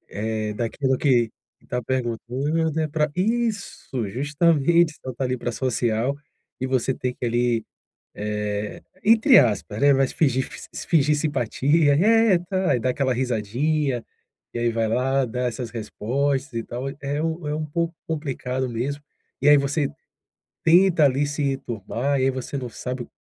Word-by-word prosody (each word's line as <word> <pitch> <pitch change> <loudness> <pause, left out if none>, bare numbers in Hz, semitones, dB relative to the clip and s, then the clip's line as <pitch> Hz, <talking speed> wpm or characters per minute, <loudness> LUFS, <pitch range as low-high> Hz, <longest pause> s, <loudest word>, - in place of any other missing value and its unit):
eh, 110 0 -2
daquilo 130 +5 -1
que 120 -6 +3 0.4
tá 125 0 -2
perguntando, 130 +6 -1
é 155 - +1
pra 150 0 0
isso, 205 - -1
justamente, 155 - +2
só 130 - -4
tá 135 - -2
ali 125 0 0
para 120 - -3
social, 120 0 0 0.5
e 130 - -1
você 130 0 0
tem 125 0 -2
que - - -6
ali, 120 -1 +1 0.5
eh, 105 0 -3 0.2
entre 230 +4 +6
aspas, 105 -2 0
né, 140 0 +5
mas 135 -1 +2
fingir 130 -4 +1 0.2
se - - -7
fingir 150 -2 +3
simpatia, 145 +1 +2
eh, 220 +1 +4
tá 190 -4 +1
e 120 - -1
da 130 - 0
aquela 130 0 +1
risadinha, 125 +3 0 0.5
e - - -2
aí 120 0 +1
vai 115 0 0
lá, 130 +4 +1
dá 125 +1 -4
essas 120 -1 -4
respostas 130 +5 -2
e 115 -1 -2
tal, 125 +4 -6
é 145 +2 -2
um 160 -1 -2
é 150 - -1
um 155 - -2
pouco 170 +3 -2
complicado 130 -4 -3
mesmo. 130 +5 -3 0.4
E 145 - +3
aí, 150 - +9
você 140 +1 +1 0.7
tenta 170 -1 +5
ali 140 +1 +3
se 145 +1 -3
enturmar, 135 0 -2
e - - +2
aí 135 - +3
você 130 +2 -5
não 125 -2 -4
sabe 125 +1 -5
135 Hz, 160 wpm, -24 LUFS, 120-150 Hz, 0.7 s, aí